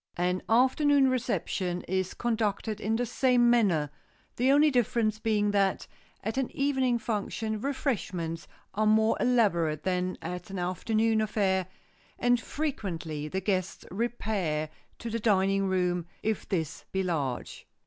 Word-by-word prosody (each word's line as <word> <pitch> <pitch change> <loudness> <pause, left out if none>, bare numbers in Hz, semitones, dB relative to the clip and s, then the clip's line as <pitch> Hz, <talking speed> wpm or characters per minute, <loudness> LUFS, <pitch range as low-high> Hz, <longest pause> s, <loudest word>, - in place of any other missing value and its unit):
An 180 +1 0
afternoon 265 +3 +4
reception 195 -7 -1
is 185 0 -2
conducted 220 -2 -1
in 220 +2 0
the 245 +2 0
same 245 0 +3
manner, 175 -11 +2 0.4
the 255 +3 +3
only 295 +2 +5
difference 230 -3 +1
being 210 -2 +1
that, 195 -2 +1 0.4
at 220 +5 -2
an 265 - -1
evening 265 -3 +2
function 220 -1 -3
refreshments 185 - -2 0.3
are 215 +2 +1
more 220 +1 +4
elaborate 175 -11 +2
than 185 -1 -1
at 180 +1 -6
an 195 - -5
afternoon 220 +5 +1
affair, 190 -4 +1 0.5
and 245 -1 +2
frequently 175 - -4
the 190 +4 -3
guests 185 -1 -2
repair 190 -8 -2 0.3
to 235 - -6
the 230 - -1
dining 195 -2 +2
room, 180 -2 0 0.2
if 220 -1 -2
this 165 -7 -2
be 190 0 0
large. 145 -9 -3
210 Hz, 135 wpm, -28 LUFS, 180-235 Hz, 0.5 s, only